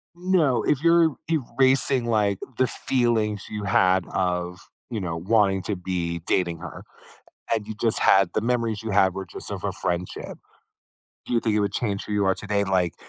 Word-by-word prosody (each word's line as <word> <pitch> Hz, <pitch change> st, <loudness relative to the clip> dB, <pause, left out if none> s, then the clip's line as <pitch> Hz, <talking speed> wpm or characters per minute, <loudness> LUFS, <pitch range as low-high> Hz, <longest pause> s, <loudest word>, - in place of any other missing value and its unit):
No, 175 Hz, -7 st, +2 dB
if 150 Hz, -1 st, +1 dB
you're 165 Hz, -2 st, +4 dB
e 165 Hz, -, +3 dB, 0.2 s
erasing, 130 Hz, -1 st, +4 dB
like, 105 Hz, -4 st, +1 dB, 0.2 s
the 130 Hz, -, +3 dB
feelings 115 Hz, -5 st, 0 dB
you 105 Hz, -1 st, -5 dB
had 95 Hz, -2 st, +3 dB
of, 90 Hz, 0 st, -1 dB, 0.3 s
you 110 Hz, -, -2 dB
know, 85 Hz, -3 st, -3 dB
wanting 95 Hz, 0 st, +2 dB
to 105 Hz, +2 st, -2 dB
be 90 Hz, -2 st, -3 dB
dating 85 Hz, -3 st, 0 dB
her, -, -, -9 dB, 0.7 s
and 110 Hz, -2 st, -3 dB
you 110 Hz, -, -6 dB
just 115 Hz, -2 st, +3 dB
had 95 Hz, -2 st, +4 dB
the -, -, +1 dB
memories 115 Hz, -2 st, -1 dB
you 110 Hz, -, -4 dB
have 95 Hz, -2 st, +3 dB
were 95 Hz, 0 st, -5 dB
just -, -, -7 dB
of -, -, -6 dB
a -, -, -1 dB
friendship. 90 Hz, +1 st, -4 dB, 0.9 s
Do -, -, -5 dB
you 115 Hz, -, +3 dB
think 110 Hz, -2 st, 0 dB
it -, -, +2 dB
would 100 Hz, -1 st, -1 dB
change 100 Hz, -4 st, -2 dB
who -, -, -6 dB
you 105 Hz, -1 st, +1 dB
are 95 Hz, -, +3 dB
today, 105 Hz, -1 st, -1 dB
like, 95 Hz, -3 st, 0 dB
105 Hz, 195 wpm, -24 LUFS, 95-120 Hz, 0.9 s, you're